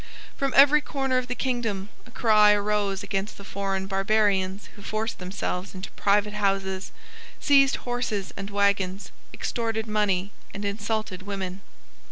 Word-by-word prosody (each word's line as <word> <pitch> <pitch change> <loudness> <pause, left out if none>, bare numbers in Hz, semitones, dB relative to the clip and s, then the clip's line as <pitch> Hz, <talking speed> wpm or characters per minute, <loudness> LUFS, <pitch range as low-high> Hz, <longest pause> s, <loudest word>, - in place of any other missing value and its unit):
From 275 -1 -1
every 290 +2 +7
corner 270 -3 0
of 250 - -5
the 250 - -3
kingdom 230 -6 -2 0.2
a - - -14
cry 215 -3 +5
arose 205 -1 0
against 200 +1 -3
the 200 - -10
foreign 195 -1 -2
barbarians 195 -1 +1
who 205 - -13
forced 215 +3 -3
themselves 185 0 -4
into 185 +1 -7
private 205 +1 +2
houses, 195 -2 -1 0.5
seized 275 -2 +5
horses 245 -5 -3
and 200 0 -6
waggons, 200 -1 0 0.2
extorted 225 -2 -2
money 205 -3 0 0.2
and 200 +1 -4
insulted 205 -1 -2
women. 195 -1 -5
205 Hz, 140 wpm, -26 LUFS, 195-220 Hz, 0.5 s, every